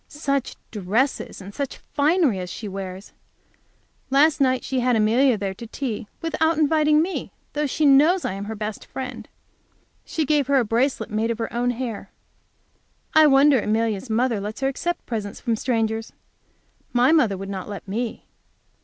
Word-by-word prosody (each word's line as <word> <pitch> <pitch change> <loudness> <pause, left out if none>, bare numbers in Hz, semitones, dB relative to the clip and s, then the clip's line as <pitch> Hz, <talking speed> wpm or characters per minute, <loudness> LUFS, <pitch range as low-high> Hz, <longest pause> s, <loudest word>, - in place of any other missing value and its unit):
Such 280 -3 -2 0.2
dresses 215 +5 -1
and 195 +2 -10
such 280 +2 -4
finery 290 - +1
as 180 -1 -5
she 210 +5 -6
wears! 190 0 -7 1.0
Last 290 +3 +4
night 260 -1 +2
she 265 - -1
had 250 0 +2
Amelia 230 +3 +3
there 195 -1 -3
to 230 +4 -9
tea, 235 -3 -4 0.2
without 320 0 +1
inviting 305 0 +4
me, 370 +2 -4 0.2
though 295 0 0
she 300 +3 0
knows 300 +7 +5
I - - -1
am 195 +1 -5
her 220 +1 -5
best 210 0 -5
friend. 250 -4 -7 0.7
She 320 -3 -2
gave 290 -2 +2
her 280 - +2
a 250 - +3
bracelet 230 0 0
made 220 +2 0
of 230 - -1
her 225 - -4
own 240 +1 0
hair. 245 -3 -4 1.0
I 315 -1 +7
wonder 275 -1 +5
Amelia's 220 +1 -1
mother 230 0 +1
lets 210 +5 -6
her 270 - +2
accept 345 +6 -3
presents 215 -3 -4
from 235 -3 0
strangers. 225 -2 -1 0.8
My 250 +3 +4
mother 235 -12 +3
would 195 +1 -6
not 190 0 -5
let 200 -2 -7
me. 225 +4 -4
245 Hz, 170 wpm, -23 LUFS, 215-280 Hz, 1.0 s, I